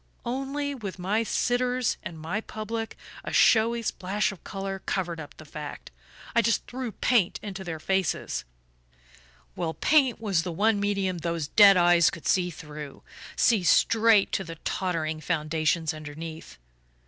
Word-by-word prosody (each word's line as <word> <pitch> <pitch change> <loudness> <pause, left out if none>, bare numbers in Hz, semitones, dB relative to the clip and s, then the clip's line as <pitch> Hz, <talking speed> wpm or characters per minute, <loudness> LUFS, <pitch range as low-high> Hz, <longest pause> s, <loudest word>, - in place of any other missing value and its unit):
Only, 275 +3 -2
with 210 -9 -6
my 195 +5 0
sitters 245 +2 0
and 165 -2 -8
my 175 +7 -3
public, 225 +1 -5 0.3
a - - -5
showy 230 0 +4
splash 205 +1 -1
of 195 - -13
colour 195 -1 -5
covered 175 -3 -2
up 145 -2 -10
the 155 - -12
fact 150 0 -8 0.4
I 235 - +6
just 230 -1 +1
threw 250 -2 -5
paint 230 -8 +2
into 195 -2 -6
their 165 -3 -5
faces.... 190 0 -1 1.1
Well, 165 -2 -3
paint 270 -8 +3
was 200 -7 +1
the 175 +1 -4
one 210 +5 +2
medium 195 -3 0
those 165 -3 -3
dead 200 -2 +7
eyes 175 -1 +5
could 165 - -10
see 180 -1 +2
through 150 -4 -9 0.3
see 225 -5 +3
straight 220 +2 +4
to 195 - -1
the 165 -2 -8
tottering 160 -4 -2
foundations 160 0 0
underneath. 155 +1 -8
190 Hz, 150 wpm, -27 LUFS, 165-225 Hz, 1.1 s, dead